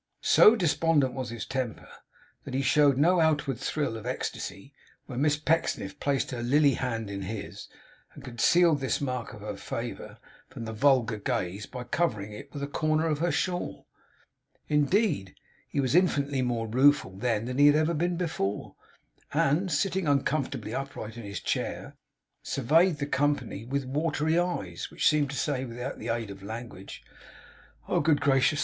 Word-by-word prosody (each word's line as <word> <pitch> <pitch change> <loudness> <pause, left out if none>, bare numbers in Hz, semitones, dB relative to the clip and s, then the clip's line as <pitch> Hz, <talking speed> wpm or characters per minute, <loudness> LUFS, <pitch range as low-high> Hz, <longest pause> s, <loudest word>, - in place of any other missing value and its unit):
So 220 - +7
despondent 165 - +2
was 130 -2 -4
his 115 -1 -5
temper, 130 -4 -4 0.6
that - - -6
he 135 - 0
showed 145 -1 +4
no 175 +5 +4
outward 150 -6 +1
thrill 140 -3 -2
of 110 +1 -7
ecstasy 125 -1 -5 0.3
when 125 -1 -4
Miss 150 0 +3
Pecksniff 150 -1 -1
placed 140 -2 0
her 120 -2 -4
lily 140 +3 +4
hand 115 -4 -3
in 100 0 -5
his, 100 +2 -6 0.5
and 145 - -11
concealed 155 +6 +3
this 130 -1 -1
mark 125 -5 -3
of - - -11
her - - -5
favour - - -6 0.3
from 115 - -7
the 110 - -5
vulgar 125 -2 +3
gaze 105 -3 -3
by 125 -1 -7
covering 110 -9 -1
it 105 - -10
with 140 -1 -6
a - - -2
corner 155 +2 0
of 155 -3 0
her 170 +1 +1
shawl. 180 -1 -2 0.8
Indeed, 150 - +1 0.3
he - - -2
was 130 -1 +1
infinitely 145 -6 +2
more 120 -2 -1
rueful 130 -3 +3
then 115 +1 -1
than 125 +2 -3
he 145 - +8
had 155 +3 +3
been 175 +1 0
before; 160 - -2 0.6
and, 170 +7 +2
sitting 185 +2 0
uncomfortably 140 0 0
upright 135 -5 -5
in 120 - -7
his 100 0 -5
chair, - - -3 0.5
surveyed 160 +6 +2
the 140 - -2
company 140 -6 -1
with 140 +2 -2
watery 155 +3 0
eyes, 100 - -3
which - - +1
seemed 150 -2 +3
to 140 - -5
say, 135 -4 -1
without 125 +2 -6
the 110 - -6
aid 115 -3 -2
of 100 0 -10
language, 110 -2 -8 0.8
'Oh, - - +1
good 145 -1 +3
gracious! 135 +1 +3
140 Hz, 165 wpm, -28 LUFS, 120-150 Hz, 0.8 s, he